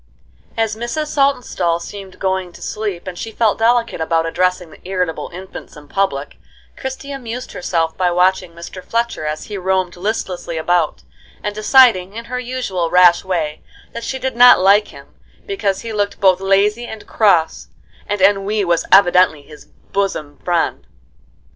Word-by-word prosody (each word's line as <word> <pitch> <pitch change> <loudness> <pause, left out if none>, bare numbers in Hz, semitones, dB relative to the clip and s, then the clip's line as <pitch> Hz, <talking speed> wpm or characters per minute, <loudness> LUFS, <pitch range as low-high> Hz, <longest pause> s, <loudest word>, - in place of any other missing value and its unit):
As 225 -1 0
Mrs. 240 +7 -3
Saltonstall 250 - +1
seemed 195 +1 -9
going 190 -2 -2
to - - -14
sleep 210 -5 -4
and 185 -1 -6
she 225 +5 -6
felt 220 -1 +1
delicate 235 -4 +1
about 165 0 +1
addressing 180 0 -1
the - - -15
irritable 180 -3 -3
infants 185 -2 -10
in 150 0 -13
public, 145 -6 -2 0.4
Christie 265 +1 -6
amused 250 -2 -6
herself 165 -2 -1
by 180 -1 +2
watching 180 0 +1
Mr. 170 +2 -9
Fletcher 230 -9 -2
as 155 0 -3
he 205 -2 -6
roamed 185 -1 0
listlessly 180 -3 -3
about, 170 0 0 0.4
and 205 - -2
deciding, 215 -4 +4
in 230 +1 -6
her 250 - -1
usual 240 -9 -3
rash 180 -1 +5
way, 160 -5 -2 0.3
that 235 - -6
she 265 - -3
did 265 -1 -3
not 245 +1 +8
like 200 +3 +4
him - - -15 0.3
because 200 - -2
he 230 -1 -6
looked 205 -1 -2
both 190 -1 +4
lazy 205 +4 +2
and 220 -2 -9
cross, 175 -7 +2 0.4
and 205 -1 -2
ennui 200 +1 +2
was 170 -1 +1
evidently 180 -5 +5
his 150 +1 -14
bosom 190 -7 -4
friend. 175 -2 -1
190 Hz, 160 wpm, -18 LUFS, 175-225 Hz, 0.4 s, not